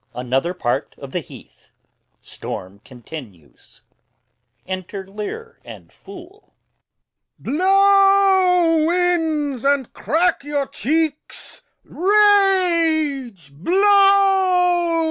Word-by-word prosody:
Another 130 Hz, +8 st, -2 dB
part 120 Hz, -8 st, -3 dB
of -, -, -11 dB
the -, -, -2 dB
heath. -, -, -16 dB, 0.5 s
Storm 95 Hz, +2 st, -8 dB
still. 120 Hz, -, -12 dB, 1.1 s
Enter 185 Hz, +1 st, -7 dB
Lear 330 Hz, -, -8 dB
and -, -, -13 dB
Fool. 385 Hz, +2 st, -15 dB, 0.8 s
Lear. 290 Hz, -, -4 dB
Blow, 385 Hz, -3 st, +3 dB
winds, 325 Hz, -7 st, -1 dB
and 280 Hz, -3 st, 0 dB
crack 335 Hz, 0 st, 0 dB
your 290 Hz, -1 st, -2 dB
cheeks! 305 Hz, +5 st, -3 dB, 0.2 s
rage! 335 Hz, -, +1 dB
blow! 375 Hz, -, +2 dB
330 Hz, 80 wpm, -19 LUFS, -, 1.1 s, Blow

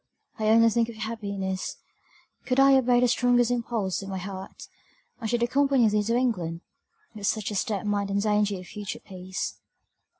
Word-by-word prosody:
I 215 Hz, -, 0 dB
only 230 Hz, +1 st, +6 dB
think 235 Hz, +1 st, +1 dB
of 235 Hz, -, -8 dB
your 215 Hz, -, -5 dB
happiness; 200 Hz, -4 st, -4 dB, 0.7 s
could 255 Hz, +1 st, +2 dB
I 275 Hz, 0 st, +7 dB
obey 250 Hz, -2 st, +4 dB
the 250 Hz, -, +4 dB
strongest 245 Hz, 0 st, +3 dB
impulse 225 Hz, -6 st, -1 dB
of 195 Hz, -, -7 dB
my 190 Hz, -, -3 dB
heart, 190 Hz, 0 st, -8 dB, 0.5 s
I 225 Hz, -, -3 dB
should 235 Hz, +1 st, 0 dB
accompany 270 Hz, -1 st, +3 dB
thee 210 Hz, 0 st, +2 dB
to 230 Hz, +3 st, 0 dB
England; 180 Hz, -10 st, -1 dB, 0.5 s
but 205 Hz, -2 st, -4 dB
such 215 Hz, -1 st, -1 dB
a -, -, -4 dB
step 210 Hz, 0 st, -1 dB
might 205 Hz, -1 st, 0 dB
endanger 205 Hz, 0 st, +1 dB
your 185 Hz, -, -7 dB
future 205 Hz, +2 st, -6 dB
peace." 185 Hz, -1 st, -6 dB
215 Hz, 175 wpm, -26 LUFS, 195-240 Hz, 0.7 s, I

